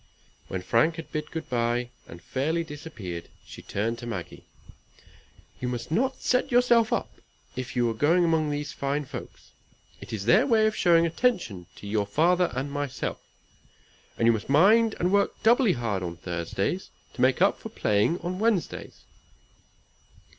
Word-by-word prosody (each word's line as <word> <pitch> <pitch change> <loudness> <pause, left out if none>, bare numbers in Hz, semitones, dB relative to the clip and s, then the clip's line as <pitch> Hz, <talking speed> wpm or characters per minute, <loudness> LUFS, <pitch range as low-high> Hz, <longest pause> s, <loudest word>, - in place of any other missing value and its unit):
When 95 -1 -4
Frank 120 - +2
had 165 -1 -9
bid 150 -1 -4
good 160 - -6
bye, 120 0 -1 0.2
and 85 0 -12
fairly 155 - -1
disappeared, 145 - -8 0.2
she - - -11
turned 115 +4 -2
to 120 - -7
Maggie. 95 -8 -6 1.1
"You 125 - -3
must 125 +3 -4
not 260 +9 0
set 255 +2 +1
yourself 240 -2 +4
up - - -2 0.4
if 130 0 -5
you 120 -2 +2
go 145 +9 +2
among 165 -3 +2
these 145 0 -3
fine 140 +1 -2
folks. - - -10 0.5
It - - -10
is 105 -3 -4
their 195 - +5
way 225 -4 +4
of 215 - +1
showing 170 -1 +4
attention 165 - -1
to - - -12
your 105 -1 0
father 175 - +2
and 135 +2 -3
myself. 145 -2 -3 1.0
And 115 - +1
you 115 - +7
must 110 +1 -3
mind 215 +10 +5
and 180 +2 +1
work 200 0 +1
doubly 235 -2 +5
hard 115 -6 -2
on 85 -2 -5
Thursdays 85 -1 -3 0.2
to - - -5
make - - +3
up - - +3
for - - -8
playing 105 +11 +1
on 180 +2 -4
Wednesdays." 220 -5 -1
145 Hz, 160 wpm, -26 LUFS, 115-180 Hz, 1.1 s, you